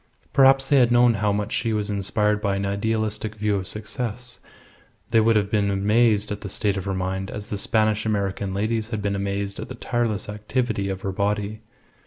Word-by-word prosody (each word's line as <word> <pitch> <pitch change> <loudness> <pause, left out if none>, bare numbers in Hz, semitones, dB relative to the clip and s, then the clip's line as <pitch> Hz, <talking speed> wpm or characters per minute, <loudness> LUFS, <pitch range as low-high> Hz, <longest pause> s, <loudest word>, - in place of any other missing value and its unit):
Perhaps 135 0 +5
had 130 -4 +5
they - - +2
known 120 0 +5
how 105 -1 +1
much 105 +1 -2
she 115 -2 0
was 105 -1 -1
inspired 105 +1 0
by 100 -2 0
an 100 0 -2
idealistic 110 +1 -1
view 105 -1 0
of 95 -1 -4
success 115 +2 -5 0.7
they 115 - +5
would 115 +1 +4
have 100 -1 +1
been 105 -2 +2
amazed 105 +2 +2
at 105 - -4
the 100 - -6
state 100 +1 0
of 95 - -4
her 95 -1 -1
mind 95 +1 -3
as 105 0 -7
the - - -2
Spanish 110 0 +1
American 100 -2 -1
ladies 110 +3 -1
had 110 -3 -3
been 100 0 0
amazed 100 0 -3
at - - -6
the 125 - -6
tireless 115 -5 -1
activity 105 0 -2
of 95 0 -4
her 95 - -2
body. 105 +2 -2
105 Hz, 205 wpm, -24 LUFS, 100-110 Hz, 0.7 s, Perhaps